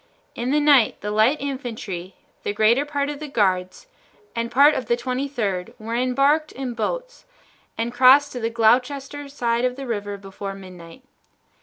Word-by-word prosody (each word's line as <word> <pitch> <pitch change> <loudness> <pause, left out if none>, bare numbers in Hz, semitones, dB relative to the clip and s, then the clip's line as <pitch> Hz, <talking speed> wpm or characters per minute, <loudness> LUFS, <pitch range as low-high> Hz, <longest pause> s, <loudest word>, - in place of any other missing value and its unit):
In 240 +2 -3
the 295 +2 +3
night 285 -6 +4
the 210 - -3
light 220 +8 +3
infantry, 225 -10 -5 0.3
the 205 - -3
greater 230 +7 +3
part 285 -1 -2
of 290 -1 -5
the 305 - -6
guards, 190 - 0 0.5
and 230 0 -2
part 285 +5 +6
of 255 -5 -3
the 235 - +2
Twenty 255 +3 -2
third 220 -5 -3
were 225 0 -6
embarked 275 +5 +2
in 260 -2 -5
boats - - -4 0.5
and 230 +1 -2
crossed 265 +3 +6
to 250 - -5
the 225 -1 -1
Gloucester 265 +5 +1
side 235 -4 -1
of 250 0 0
the 270 0 -7
river 205 -4 -4
before 195 0 -7
midnight. 185 +3 -12
245 Hz, 170 wpm, -22 LUFS, 215-280 Hz, 0.5 s, part